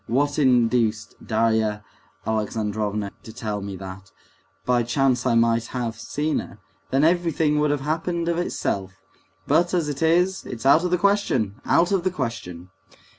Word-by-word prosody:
What 145 +5 +1
induced 115 -5 +2
Darya 110 -1 +1 0.4
Alexandrovna 105 -1 -2
to 110 - -11
tell 105 -2 -4
me 100 0 -6
that? 95 +1 -9 0.6
By 125 -1 +3
chance 125 +1 +1
I 120 - +3
might 115 0 +2
have 120 -3 -3
seen 145 +7 -2
her, - - -9 0.3
then 135 +2 +2
everything 165 -3 +2
would 150 0 +2
have 145 -1 0
happened 165 +3 -2
of 170 0 0
itself; 95 - -2 0.5
but, 170 +5 +2
as 170 -4 0
it 145 0 -5
is, 175 +4 +2
it's 120 0 -7
out 140 +5 +6
of 180 - 0
the 180 - +2
question, 150 - +1
out 175 +2 +3
of 195 -3 +1
the 185 - +2
question!" 115 - -5
125 Hz, 160 wpm, -23 LUFS, 110-160 Hz, 0.6 s, out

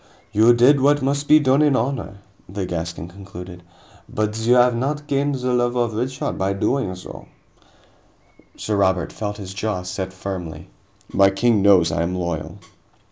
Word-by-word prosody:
"You 115 +3 +5
did 130 +4 +5
what 145 +1 +3
must 140 +1 -1
be 155 - +7
done 135 0 +3
in 145 -3 +3
honor," 115 -5 -3 0.3
the 95 0 -4
Gascon 85 -2 -5
conceded, 90 -1 -11 0.5
"but 105 0 -2
you 120 +2 +3
have 125 -1 +4
not 145 +5 -2
gained 140 -1 0
the 125 -1 -2
love 120 0 +1
of 120 -2 0
Richard 130 +4 -3
by 95 +1 0
doing 100 -1 -1
so." 90 - -11 1.3
Sir 105 -1 -2
Robert 95 -3 +1
felt 105 -1 -5
his 95 -3 -8
jaw 100 -2 -3
set 95 +1 -5
firmly. 90 -5 -7 0.4
"My 95 0 +5
king 105 +2 +2
knows 95 -4 +5
I 85 - -1
am 85 +2 -2
loyal." 85 -3 -4
105 Hz, 165 wpm, -21 LUFS, 95-125 Hz, 1.3 s, be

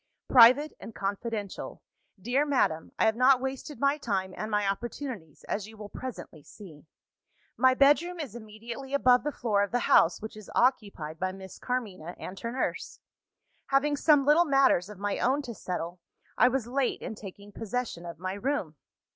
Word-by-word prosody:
"Private 255 +5 +7
and 225 - -10
confidential. 205 +1 -4 0.4
Dear 245 +9 +1
Madam, 255 - 0
I - - +3
have 220 0 +3
not 255 +2 +5
wasted 265 +3 -5
my 280 +2 +2
time 190 -8 -2
and 215 - -5
my 210 -1 +1
opportunities, 220 - -5
as 205 0 -3
you 220 0 -14
will 210 -1 -9
presently 235 -10 -8
see. 160 -2 -14 0.7
"My 260 +1 +4
bedroom 300 +6 +3
is 280 -9 -5
immediately 235 +5 -7
above 250 -3 +4
the 295 - -1
floor 215 -7 0
of 205 - 0
the 245 - 0
house 170 - +4
which 220 0 -8
is 215 -2 -12
occupied 200 - 0
by 185 0 -1
Miss 190 -1 -11
Carmina 200 -9 -4
and 190 +1 -8
her 230 - -4
nurse. 255 - -3 0.7
Having 285 +2 +2
some 290 -2 +4
little 305 +4 +5
matters 270 - +3
of 210 - -10
my 205 +1 -2
own 270 +4 +1
to 240 - -6
settle, 180 -3 -5 0.4
I - - +5
was 255 -2 0
late 255 +2 -1
in - - -5
taking 205 -1 -11
possession 225 -4 -4
of 170 -1 -8
my 185 +2 -4
room. 200 - -3
230 Hz, 175 wpm, -28 LUFS, 195-265 Hz, 0.7 s, Private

